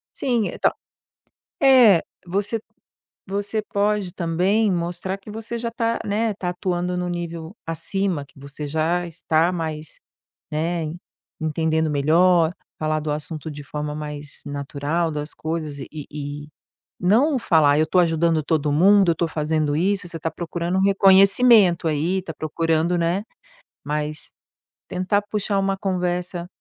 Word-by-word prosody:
Sim, 240 -5 0
então, - - +1 0.9
eh, 245 -10 +7 0.2
você 200 +5 -1 0.7
você 205 +2 -2
pode 205 -3 0
também 190 +5 +1
mostrar 175 +2 -2
que 195 +2 -13
você 225 +2 -5
já 235 0 -3
tá, 230 -1 -1
né, 215 +1 0
tá 180 -2 -4
atuando 180 0 -2
no 180 0 -2
nível 170 +1 -5
acima 170 -1 -1
que - - -26
você 140 +2 -7
já 160 +4 0
está 165 +1 +1
mais, 160 -3 -5 0.5
né, 160 0 -1 0.5
entendendo 160 0 0
melhor, 165 +4 +3 0.2
falar 155 0 0
do 155 0 -4
assunto 155 +1 -5
de 145 -1 -8
forma 150 +1 -4
mais 150 -1 -6
natural 145 +4 -2
das 150 0 -5
coisas 155 -3 -4
e 135 - -7
e 150 -2 -7 0.4
e - - -19 0.5
não 250 - +3
falar: 155 -9 +4
"Eu 155 - +3
tô 185 - +1
ajudando 165 -1 +3
todo 150 -1 0
mundo, 190 +3 +5
eu - - +2
tô 165 +1 -1
fazendo 155 -1 0
isso". 190 +2 0
Você 170 - -6
tá 165 +1 -2
procurando 175 +2 -3
um - - +2
reconhecimento 195 -1 +5
aí, 165 +5 0
tá 165 - -6
procurando, 165 +2 0
né. 175 +5 0 0.6
Mas 150 +1 -3 0.6
tentar 185 +3 0
puxar 205 -1 -1
uma 195 0 +1
conversa 180 -2 -2
170 Hz, 140 wpm, -22 LUFS, 155-195 Hz, 0.9 s, eh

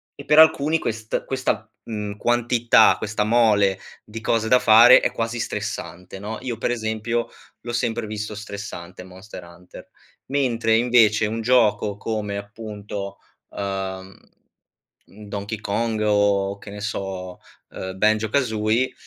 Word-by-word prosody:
e 140 - -11
per 150 - +5
alcuni 160 0 +5
quest 110 -4 -3
questa, 125 -4 -2
mhmm, 105 -2 -5
quantità, 120 0 +4
questa 105 -1 -2
mole 105 -4 +3 0.3
di 110 +1 -9
cose 110 -1 0
da 125 - +6
fare 120 +1 +8
è - - 0
quasi 115 +1 -3
stressante, 95 -5 -5
no, 105 +3 -6
io 120 -4 -4
per 120 - -1
esempio 110 0 -2 0.3
l'ho 120 0 -6
sempre 115 -1 -1
visto 105 0 -5
stressante 100 -4 -8
Monster 95 +1 -11
Hunter. 85 +1 -14 0.4
Mentre 120 -5 +1
invece 115 -3 +4
un 110 +2 -3
gioco 110 -4 +2
come 105 -2 -3
appunto, 100 -1 -7 0.3
uhm, 95 -1 -5 0.9
mhmm, 105 +1 -14
Donkey 100 +2 -5
Kong 110 +2 -2
o 100 -1 +1
che 100 - -11
ne 105 - -8
so, 95 -3 -5 0.3
ehm, 95 0 -7
Banjo-Kazooie, 110 +2 +1
110 Hz, 130 wpm, -22 LUFS, 100-115 Hz, 0.9 s, fare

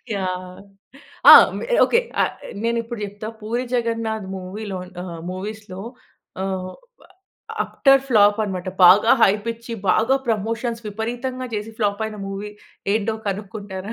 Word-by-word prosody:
Yeah! 185 -1 -4 0.7
ఆ! - - +13 0.3
మె - - -5 0.2
okay. 470 - +3 0.2
ఆహ్, - - -1 0.3
నేనిప్పుడు 230 0 -2
చెప్తా 205 +1 -7
పూరి 235 +4 -2
జగన్నాథ్ 230 -3 -1
మూవీ‌లో‌ 190 +1 -6 0.2
ఆహ్ 170 -2 -7
మూవీస్‌లో 200 0 -7 0.6
ఆహ్ 190 -1 -3 0.9
అప్టర్ 270 -1 +3
ఫ్లాప్ 205 -2 +5
అనమాట 185 -2 -4 0.2
బాగా 205 +6 +7
హైప్ 205 +3 +3
ఇచ్చి 230 +1 -10 0.2
బాగా 225 +7 +3
ప్రమోషన్స్ 230 +2 -2
విపరీతంగా 245 +4 -4
చేసి 210 +1 -4
ఫ్లాప్ 205 -1 0
అయిన 215 - -7
మూవీ 200 +1 -6 0.4
ఏంటో 220 0 0
కనుక్కుంటారా? 200 0 -6
210 Hz, 120 wpm, -21 LUFS, 195-230 Hz, 0.9 s, ఆ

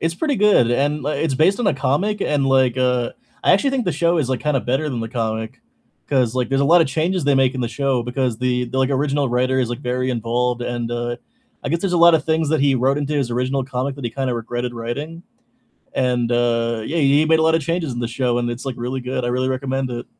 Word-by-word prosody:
It's 165 +1 -1
pretty 290 - -1
good, 200 - +4
and 145 +3 0
like, 150 +2 -2
it's 155 -5 0
based 190 - +2
on 235 - 0
a 195 - +3
comic, 185 +11 0
and, 145 -6 +1
like, 130 -2 +3
uh, 125 -2 +1 0.3
I - - +5
actually 235 +9 +3
think 265 -3 -1
the 180 - 0
show 170 0 +1
is, 135 - 0
like, 130 -1 -1
kinda 150 -3 0
better 135 +6 -1
than 125 -5 -3
the 115 - -4
comic 110 0 -3 0.5
'cause, 130 -4 +1
like, 125 -1 -1
there's 135 0 +1
a - - +3
lot 170 +5 +6
of 165 - +3
changes 160 +5 -1
they 145 -1 +3
make 135 -1 +2
in 130 - -3
the 120 - -1
show 135 -1 -1
because 125 -1 -2
the 125 -1 0
the, 125 +2 -4
like, 130 +1 +2
original 140 0 0
writer 130 +2 +1
is, 120 - -1
like, 120 - -4
very 125 +1 -1
involved 120 +1 -1
and, 120 -1 -3
uh, 120 0 -3 0.5
I - - -2
guess 165 +3 0
there's 190 -1 -1
a 175 - +2
lot 170 0 +7
of 155 - +1
things 160 -1 0
that 155 -1 +1
he 140 -1 +3
wrote 135 +3 +1
into 145 +1 -2
his 135 -4 -1
original 130 +3 -1
comic 130 +1 -3
that 140 - -9
he 120 - -2
kind 135 +1 -3
of - - -1
regretted 120 +1 -4
writing. 145 +9 -5 0.7
And, 125 -2 0
uh, 115 -1 0
yeah, 165 +7 -2
he 145 +1 +4
made 160 0 +3
a - - +2
lot 160 0 +3
of 165 - 0
changes 165 0 -2
in 120 - -5
the 120 - -2
show, 120 0 -1
and 120 0 -1
it's 120 +1 -5
like 135 -2 -3
really 125 +2 -3
good. 125 0 -3
I - - -1
really 130 +1 0
recommend 130 0 -2
it. 120 0 -5
130 Hz, 265 wpm, -20 LUFS, 120-150 Hz, 0.7 s, lot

